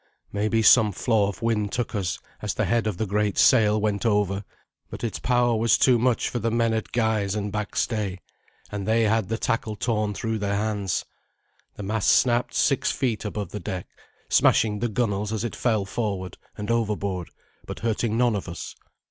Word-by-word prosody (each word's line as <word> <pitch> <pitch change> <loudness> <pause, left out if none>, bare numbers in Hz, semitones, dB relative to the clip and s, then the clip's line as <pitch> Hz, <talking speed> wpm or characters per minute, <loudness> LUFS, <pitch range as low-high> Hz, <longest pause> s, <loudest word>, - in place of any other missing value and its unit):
Maybe 110 +2 +1
some 110 -2 +6
flaw 105 +1 +1
of 100 +2 -8
wind 105 -3 0
took 120 0 -2
us 95 -5 -1 0.2
as - - -2
the - - 0
head 115 -2 +1
of 105 -5 -2
the 110 - -1
great 105 0 0
sail 110 -4 +5
went 105 -1 -1
over, 105 -3 +1 0.5
but - - -8
its 115 - -2
power 120 -1 +2
was 115 +1 +3
too 125 -3 +4
much 125 0 +1
for 120 - -3
the 115 +1 0
men 115 0 +1
at 110 -1 -3
guys 110 -4 0
and 105 -1 -3
back 105 -1 -4
stay, 105 -5 -1 0.5
and 100 -2 -4
they 115 +1 +3
had 110 -2 +1
the 115 - -1
tackle 115 -2 -1
torn 105 -2 -1
through 115 +1 -2
their 100 -1 -1
hands. 105 -3 -1 0.7
The 105 - -7
mast 105 +1 0
snapped 120 -1 +2
six 135 - +2
feet 115 -5 -2
above 105 -3 -4
the 105 - -5
deck, 90 -3 -5 0.4
smashing 105 -2 +3
the 120 +2 -1
gunwales 105 -2 -1
as 110 0 -2
it 120 - -3
fell 110 -5 0
forward 100 -3 -4 0.2
and 105 +2 -3
overboard, 100 -6 -1 0.4
but - - -7
hurting 115 0 0
none 120 -2 +3
of 95 -3 -4
us. 85 - -7
110 Hz, 190 wpm, -25 LUFS, 100-115 Hz, 0.7 s, some